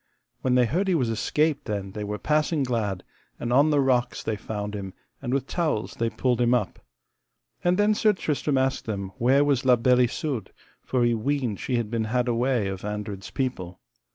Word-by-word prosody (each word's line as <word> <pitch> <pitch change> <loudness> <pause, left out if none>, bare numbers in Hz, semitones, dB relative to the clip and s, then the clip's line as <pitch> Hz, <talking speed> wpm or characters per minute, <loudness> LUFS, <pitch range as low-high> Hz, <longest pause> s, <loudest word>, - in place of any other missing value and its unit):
When 125 -1 +2
they 125 -1 +5
heard 180 - 0
he 185 - +3
was 125 -7 +1
escaped 150 +6 0
then 100 -3 -3
they 105 +2 -5
were 105 0 -3
passing 150 +3 +1
glad; 110 -7 -1 0.4
and 120 0 -2
on 140 +4 +5
the 145 -1 +3
rocks 125 -3 +1
they 110 - -1
found 105 0 -5
him, 95 -2 -6 0.3
and 120 - -3
with 135 0 0
towels 155 -9 -1
they 115 0 -1
pulled 125 0 0
him 120 +1 +4
up. 105 -7 -2 0.8
And 180 +1 +3
then 205 +1 +4
Sir 215 0 +3
Tristram 150 -5 -1
asked 130 0 0
them 100 -3 -3
where 135 +4 +4
was 140 -2 +2
La 130 -1 +6
Beale 125 +1 +3
Isoud, 125 -5 -3 0.3
for 125 -2 0
he 120 0 +3
weened 125 -2 -1
she 125 - -2
had 115 -2 -1
been 115 -2 0
had 125 +3 0
away 120 -2 +1
of 95 -1 -5
Andred's 105 -2 -5
people. 95 -10 -3
125 Hz, 200 wpm, -25 LUFS, 105-140 Hz, 0.8 s, La